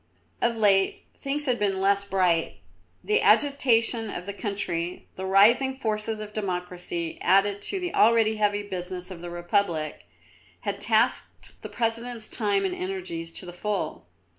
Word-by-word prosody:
Of 235 -1 +1
late 195 -3 +2
things 290 +2 -3
had 250 -3 +1
been 195 -2 +1
less 200 +1 +3
bright. 180 -4 +1 0.5
The 425 +1 +2
agitation 235 -5 +3
of 180 - -6
the 200 - -4
country, 180 -5 -3
the 190 0 -5
rising 235 +8 +5
forces 220 -3 -2
of 210 0 -7
Democracy, 180 -4 -4
added 200 +1 +3
to 390 - -1
the 355 -1 -4
already 220 -1 +4
heavy 205 -1 +1
business 180 0 -4
of 170 -2 -8
the 175 - -6
Republic, 175 -3 -1 0.5
had - - -4
taxed - - 0
the - - -7
President's 230 0 -2
time 205 -3 0
and 185 - -1
energies 180 -3 -4
to 185 - -5
the 175 - -8
full. 180 - -3
200 Hz, 150 wpm, -26 LUFS, 180-225 Hz, 0.5 s, rising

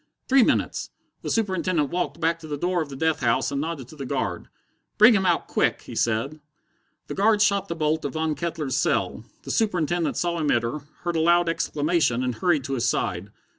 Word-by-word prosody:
Three 265 0 +5
minutes! - - +1 0.3
The - - -5
Superintendent 185 -8 0
walked 170 -3 -2
back 165 0 +1
to 160 - -10
the 145 -1 -4
door 175 +3 0
of 155 - -5
the 135 - -7
death 160 +3 0
house 115 -3 +1
and 140 0 -1
nodded 155 -5 -4
to - - -12
the 140 - -6
guard. 115 -11 -3 0.5
"Bring 220 +3 +8
him 190 -3 +2
out 175 - +1
quick!" - - 0
he - - -10
said. 120 +7 -1 0.7
The - - -6
guard 210 +2 +3
shot 200 -2 +2
the 170 - -4
bolt 155 0 0
of - - -3
Von 160 -1 -1
Kettler's 155 -3 -3
cell. - - 0 0.2
The - - -5
Superintendent 175 -6 0
saw 170 -1 -1
him 150 -2 0
enter, 120 +4 0 0.2
heard 175 -1 -1
a - - +2
loud 175 +1 +4
exclamation, 150 -5 0
and 125 -1 -1
hurried 155 +3 +1
to 135 +1 -4
his 120 -2 +1
side. 90 +3 -2
160 Hz, 210 wpm, -24 LUFS, 140-175 Hz, 0.7 s, Bring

